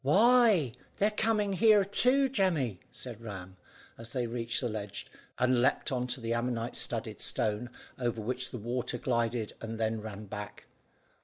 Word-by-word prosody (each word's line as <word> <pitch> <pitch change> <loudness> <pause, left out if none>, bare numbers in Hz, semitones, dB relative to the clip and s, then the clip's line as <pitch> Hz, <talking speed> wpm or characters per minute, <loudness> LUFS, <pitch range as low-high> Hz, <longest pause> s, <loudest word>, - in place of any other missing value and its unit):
"Why, 205 - +5 0.2
they're 210 +2 +2
coming 210 -2 +1
here 210 0 +5
too, 255 +7 +5
Jemmy," 170 - 0
said 120 -3 -9
Ram, 95 -4 -8 0.4
as 115 0 -8
they 125 -2 0
reached 115 0 -1
the 125 - 0
ledge, 105 -3 -5 0.3
and 125 -1 +3
leaped 130 - +2
on 125 -1 -1
to 125 +1 -4
the 115 -1 -2
ammonite 120 0 -2
studded - - -2
stone, 110 +3 -1 0.3
over 120 -2 -1
which 125 +4 -1
the 125 - -6
water 120 +2 -3
glided 115 -2 -1
and 115 0 -5
then 110 0 0
ran 105 -1 -7
back. 105 0 -8
120 Hz, 160 wpm, -30 LUFS, 115-175 Hz, 0.4 s, Why